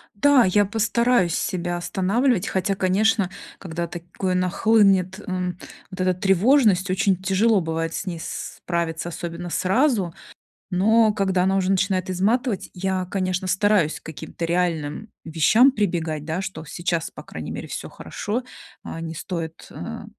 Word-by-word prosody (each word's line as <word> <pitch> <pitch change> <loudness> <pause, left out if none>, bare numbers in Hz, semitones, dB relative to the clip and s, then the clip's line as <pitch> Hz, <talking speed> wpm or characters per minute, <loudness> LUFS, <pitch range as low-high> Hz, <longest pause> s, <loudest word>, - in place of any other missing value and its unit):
Да, 265 +4 +5
я 205 +2 +3
постараюсь 225 -2 +2
себя 175 -2 -2
останавливать, 200 +5 +1
хотя, 195 +1 0
конечно, 195 +1 +2 0.3
когда 170 -1 -4
такое 175 +2 -4
нахлынет, 190 0 +3
м, 180 -2 -2 0.3
вот 185 - -10
эта 185 0 +2
тревожность, 195 +1 +3
очень 190 +1 +2
тяжело 195 +2 +3
бывает 165 0 -2
с - - -4
ней 170 -3 -4
справиться, 170 -1 -4
особенно 175 +1 -6
сразу, 195 - +1 0.6
но 215 +4 +4
когда 190 -3 +1
она 190 +1 +2
уже 190 -1 +1
начинает 185 -1 +1
изматывать, 205 +4 0
я, 185 0 -1
конечно, 185 -1 -1
стараюсь 185 -3 +2
к - - -18
каким-то 160 +2 -6
реальным 170 +1 -1 0.2
вещам 170 - +5
прибегать, 170 - -1
да. 160 +3 -2
Что 190 -5 -6
сейчас, 170 +1 -2
по - - -10
крайней - - -7
мере, - - -6
всё - - -6
хорошо, 225 +5 -4 0.4
а, 165 - -7
не 165 0 -5
стоит, 165 -1 -5
э, - - -7
185 Hz, 145 wpm, -23 LUFS, 175-205 Hz, 0.6 s, Да